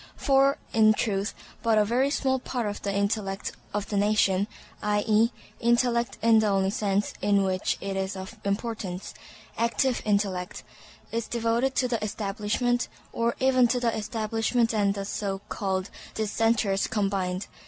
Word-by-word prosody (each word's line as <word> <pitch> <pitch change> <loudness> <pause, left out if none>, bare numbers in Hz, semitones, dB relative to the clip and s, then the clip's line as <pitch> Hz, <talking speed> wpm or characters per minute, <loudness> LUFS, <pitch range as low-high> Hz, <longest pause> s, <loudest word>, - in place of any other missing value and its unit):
For, 275 0 +3 0.2
in 215 -2 +5
truth, 200 -2 -1 0.3
but 225 -2 +3
a 210 - +4
very 250 +6 +2
small 265 -2 +1
part 245 -2 -3
of 205 0 -4
the 200 - -2
intellect 200 -1 -1 0.2
of 205 -1 -3
the 205 - -1
nation—i.e., 210 +2 +1 0.3
intellect 235 0 +2
in 225 -1 +6
the 215 - +2
only 195 -1 +2
sense 200 -1 0
in 200 -1 +3
which 185 0 0
it 195 0 -3
is 190 +1 -2
of 190 +4 -8
importance—active 225 +4 -2
intellect, 200 -3 -1 0.5
is 230 0 -2
devoted 235 +3 0
to 255 - +2
the 235 -3 -2
Establishment 215 +4 -1 0.3
or 235 0 0
even 255 -2 +4
to 245 +1 +1
the 235 -2 0
Establishment 225 +2 0
and 200 -2 +2
the 200 -1 -4
so 195 -1 -2
called 190 -2 -2 0.2
Dissenters 220 -2 +1
combined. 195 -3 -1
215 Hz, 145 wpm, -27 LUFS, 200-235 Hz, 0.5 s, in